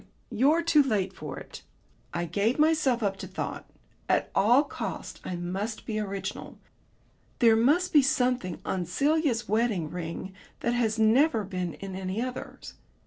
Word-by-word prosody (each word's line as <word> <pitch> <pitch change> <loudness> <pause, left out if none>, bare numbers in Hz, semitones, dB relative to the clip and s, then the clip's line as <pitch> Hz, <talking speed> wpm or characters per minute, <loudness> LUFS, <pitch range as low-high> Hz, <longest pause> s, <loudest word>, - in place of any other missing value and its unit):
You're 280 +9 +3
too 325 -3 +5
late 205 -8 0
for 150 -5 -7
it." - - -10 0.5
I 170 0 -2
gave 205 +8 0
myself 305 -6 +3
up 195 -1 0
to - - -7
thought. - - -5 0.4
At - - +1
all 240 +8 +5
costs 285 - -6
I 180 - -4
must 190 +6 -4
be 215 -1 -2
original. 195 -2 -5 0.8
There 230 -3 +5
must 295 +11 +3
be 295 - +8
something 250 -8 0
on 180 -3 -2
Celia's 280 - +1
wedding 215 -7 0
ring 175 +2 -5 0.3
that 235 - 0
had 230 -2 +1
never 225 +2 +4
been 180 -3 -4
in 195 -1 -7
any 190 +2 -3
other's.... 255 +1 -6
220 Hz, 150 wpm, -28 LUFS, 190-255 Hz, 0.8 s, be